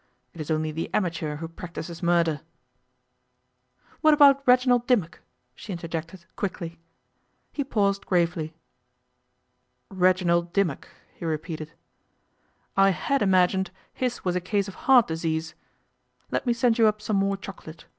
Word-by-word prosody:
It 170 - -8
is 155 - -7
only 155 0 0
the 160 +2 -4
amateur 165 -6 -1
who 165 +2 -6
practises 170 0 -8
murder 170 -3 +2 0.8
' - - -36
'What 310 -1 +6
about 280 -2 +6
Reginald 250 -1 +4
Dimmock?' 195 -10 +1 0.3
she 210 - -9
interjected 170 +1 -6
quickly. 170 -4 -4 0.7
He 285 - -2
paused 200 -6 0
gravely. 170 -3 0 1.4
'Reginald 180 -2 +2
Dimmock,' 195 -8 0 0.3
he - - -12
repeated. 155 0 -4 1.0
'I 195 0 +5
had 195 - 0
imagined 190 -1 +3 0.2
his 250 -4 -3
was 180 -1 0
a 180 - 0
case 200 +2 -1
of 195 - -7 0.2
heart 250 -4 +8
disease. 160 0 -2 0.8
Let - - -2
me 240 - +4
send 235 -1 +2
you 225 - +6
up 215 0 +1
some 210 -1 -1
more 195 0 +1
chocolate. 165 -4 -10
180 Hz, 135 wpm, -25 LUFS, 165-210 Hz, 1.4 s, heart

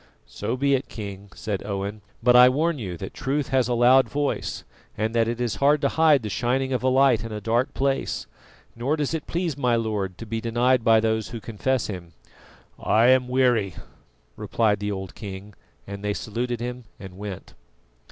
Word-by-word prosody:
"So 120 - -4
be 140 +1 +2
it, 135 0 0
King," 100 -2 -8
said 105 -3 -3
Owen; 100 +1 -4 0.2
"but 125 0 +5
I 125 0 +9
warn 155 +3 0
you 90 -6 -5
that 95 - -7
Truth 145 -1 -2
has 130 -2 +2
a 120 - 0
loud 125 +3 +5
voice, 145 0 -2 0.3
and 110 +1 -1
that 115 -1 +2
it 120 +1 -2
is 120 -3 -1
hard 145 +2 +4
to 140 - +2
hide 155 -5 +4
the - - -3
shining 130 +5 0
of 125 - 0
a 130 - 0
light 130 -3 +4
in 115 - -6
a 105 - -4
dark 115 +6 0
place, 135 0 -1 0.5
nor 125 +6 0
does 150 0 -1
it 160 -2 -4
please 170 -3 -2
my 125 -4 +1
Lord 105 -5 -2
to 115 - -8
be 115 +1 -3
denied 120 +2 +2
by 110 -1 +5
those 110 -1 0
who 115 - -6
confess 115 +4 -1
Him." 90 -5 -7 0.7
"I 115 +3 +4
am 130 -1 +4
weary," 125 -7 +2 0.6
replied 105 -3 0
the 105 0 -2
old 95 -1 -5
king, 100 0 -8 0.3
and 100 0 -8
they 105 0 -1
saluted 120 +2 -3
him 125 0 -5
and 95 -3 -10
went. 100 -1 -8
120 Hz, 195 wpm, -24 LUFS, 105-130 Hz, 0.7 s, I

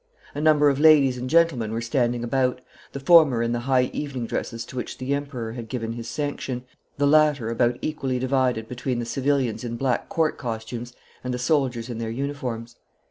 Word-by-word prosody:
A 145 - -4
number 150 -1 +5
of 140 -1 +2
ladies 150 -4 +6
and 125 +1 -4
gentlemen 155 -9 +3
were 115 - -2
standing 120 0 0
about, 125 +1 0 0.3
the 140 - -6
former 140 -5 +5
in 115 - -1
the 120 - 0
high 125 -1 +3
evening 135 -5 -4
dresses 115 0 -4
to - - -12
which 125 -2 -5
the 130 +2 -2
Emperor 140 -5 -4
had 115 -1 -7
given 115 -2 -3
his 115 0 -7
sanction, 135 -3 -3 0.3
the 145 - +2
latter 145 -5 +3
about 120 +1 +1
equally 135 -4 -2
divided 130 -3 0
between 125 +1 -3
the 120 - -2
civilians 135 -1 0
in 120 -1 -4
black 125 0 -1
court 160 -2 0
costumes 120 +1 -5 0.3
and 125 -1 -2
the - - -3
soldiers 125 -3 0
in 120 -2 -5
their 115 -1 -3
uniforms. 120 -2 -4
125 Hz, 190 wpm, -24 LUFS, 120-140 Hz, 0.3 s, ladies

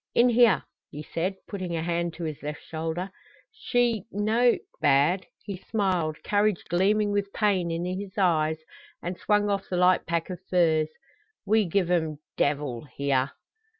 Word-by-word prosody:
"In 245 +1 +6
here," 235 -4 +5 0.3
he 150 - -7
said, 180 +5 -2
putting 185 -4 -4
a 160 - -2
hand 170 0 -1
to 175 - -6
his 155 -3 -4
left 150 0 -6
shoulder. 165 +4 -4 0.4
"She 245 - 0
no 225 +4 +3 0.2
bad." 145 +7 +3 0.2
He 200 -3 -5
smiled, 180 -6 -1
courage 205 -2 +1
gleaming 205 +4 +2
with 200 -1 -1
pain 195 -5 +1
in 165 +1 -2
his 190 +2 -5
eyes, 160 -5 +2 0.5
and 180 +1 -3
swung 205 +2 +1
off 200 -1 -1
the 180 - -1
light 180 0 +4
pack 170 +2 -1
of 180 - -6
furs. 160 -4 +3 0.6
"We 215 +1 +3
give 180 0 0
'em 160 -4 +1 0.2
devil 140 -3 -1
here!" 140 -1 -1
180 Hz, 155 wpm, -27 LUFS, 160-205 Hz, 0.6 s, In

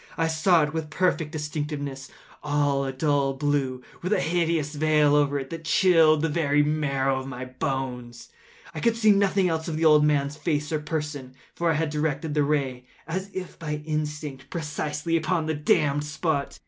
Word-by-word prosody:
I 165 - +2
saw 160 +1 +3
it 150 0 -2
with 160 -1 -3
perfect 165 -3 0
distinctness—all 145 -1 -3
a 135 - -2
dull 140 0 +1
blue, 135 -3 -1 0.2
with 180 +2 -3
a 210 - +3
hideous 165 -3 0
veil 150 -1 +3
over 145 -1 +2
it 135 -1 -6
that 165 -1 -6
chilled 160 -2 +4
the - - +3
very 150 -2 +2
marrow 140 -3 0
in 135 - -8
my 130 -1 -6
bones; 130 -2 -4 0.4
but - - -8
I - - -2
could 230 -1 +2
see 215 -2 +5
nothing 195 -1 +3
else 160 -1 -2
of 160 -2 -3
the 165 - +1
old 150 -1 +6
man’s 145 -1 +1
face 150 -3 -1
or 155 - 0
person: 150 -4 -5 0.2
for 170 -1 0
I 160 - +2
had 155 0 -1
directed 150 0 -2
the 150 - +2
ray 135 -4 -1 0.2
as 190 +4 -3
if 185 -2 -7
by 150 -2 -4
instinct, 150 -3 -4
precisely 150 0 -3
upon 165 0 0
the 160 - -1
damned 145 -1 +2
spot. 150 -1 -2
150 Hz, 185 wpm, -25 LUFS, 140-160 Hz, 0.4 s, old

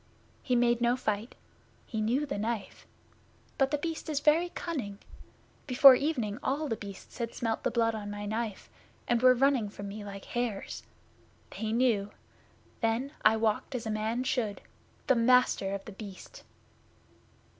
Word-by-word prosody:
He 250 - 0
made 240 0 +3
no 240 +1 +3
fight. 215 -1 -2 0.5
He 220 -2 -3
knew 245 +7 +1
the 280 -8 -4
Knife! 225 0 -4 0.7
But 270 -1 +4
The 295 - 0
Beast 320 +1 -4
is 295 -2 0
very 315 +4 +3
cunning. 260 - -4 0.7
Before 265 +1 +9
evening 250 -6 -1
all 295 +3 -1
The 225 - -1
Beasts 200 +2 -10
had 235 -1 -3
smelt 225 -2 -1
the - - 0
blood 230 -1 +1
on 210 -2 -5
my 205 0 -5
knife, 215 -1 -3 0.4
and 240 -1 +2
were 255 0 +7
running 260 -4 +2
from 200 0 -7
me 210 +1 -7
like 200 -1 -8
hares. 240 -5 -3 0.7
They 220 -1 -3
knew! 225 -4 +2 0.7
Then 230 +4 0
I 220 +1 +5
walked 220 +4 0
as 235 - -4
a 220 - -2
man 220 +3 -1
should 235 -5 -1 0.4
the 265 - +4
Master 245 -4 +3
of 195 - -7
The - - -8
Beast! 195 -1 -10
230 Hz, 160 wpm, -30 LUFS, 215-255 Hz, 0.7 s, Before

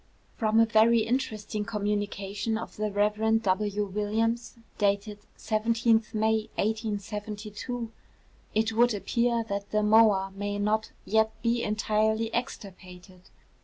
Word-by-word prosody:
From 220 0 +2
a 225 - +6
very 225 +1 +4
interesting 215 -3 -2
communication 205 0 -2
of 230 - -7
the 215 0 -2
Rev. 210 +2 +2
W. 205 +1 0
Williams, 220 +5 -1 0.2
dated 205 0 0 0.2
17th 225 0 +1
May 220 0 +1
1872, 215 +2 -4 0.6
it 225 +1 +1
would 235 0 +3
appear 235 +3 0
that 200 0 -4
the 215 0 +1
moa 210 -3 +4
may 205 0 -3
not 215 +1 0
yet 220 0 +1
be 235 0 +1
entirely 220 +1 0
extirpated. 185 -5 -7
215 Hz, 115 wpm, -28 LUFS, 205-225 Hz, 0.6 s, a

